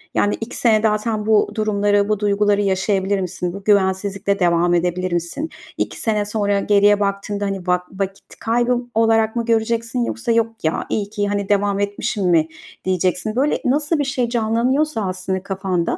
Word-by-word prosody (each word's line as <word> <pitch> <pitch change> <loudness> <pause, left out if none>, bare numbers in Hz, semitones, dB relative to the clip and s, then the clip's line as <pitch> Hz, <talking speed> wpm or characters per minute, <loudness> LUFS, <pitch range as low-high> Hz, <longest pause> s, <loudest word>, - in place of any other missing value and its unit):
Yani, 205 - +2
2 225 - -5
sene 220 -3 +3
zaten 215 0 0
bu 215 -1 +3
durumları, 205 -1 +1
bu 210 - +1
duyguları 205 0 +2
yaşayabilir 195 0 0
misin? 180 -1 -3
Bu 200 +1 -8
güvensizlikle 195 0 +1
devam 175 -1 +2
edebilir 180 +1 0
misin? 175 - -2 0.3
2 - - -3
sene 210 -2 0
sonra 205 -1 0
geriye 205 0 +4
baktığında, 200 0 -2
hani, 195 -2 -4
va 180 0 +2
vakit 195 0 -6
kaybı 240 +2 +1 0.2
olarak 225 0 +3
mı 235 - -1
göreceksin 230 +1 0
yoksa: 235 +1 -2
"Yok 225 0 0
ya, 160 0 -1
iyi 205 -2 -2
ki, 205 -1 -2
hani, 200 -1 -2
devam 200 0 +1
etmişim." 205 0 -2
mi 160 -2 +3 0.4
diyeceksin? 185 +4 0
Böyle, 280 +4 +1
nasıl 295 +4 +1
bir - - +2
şey 260 -3 -1
canlanıyorsa 240 +4 0
aslında 185 0 -3
kafanda 190 -3 -2
205 Hz, 165 wpm, -20 LUFS, 190-225 Hz, 0.4 s, geriye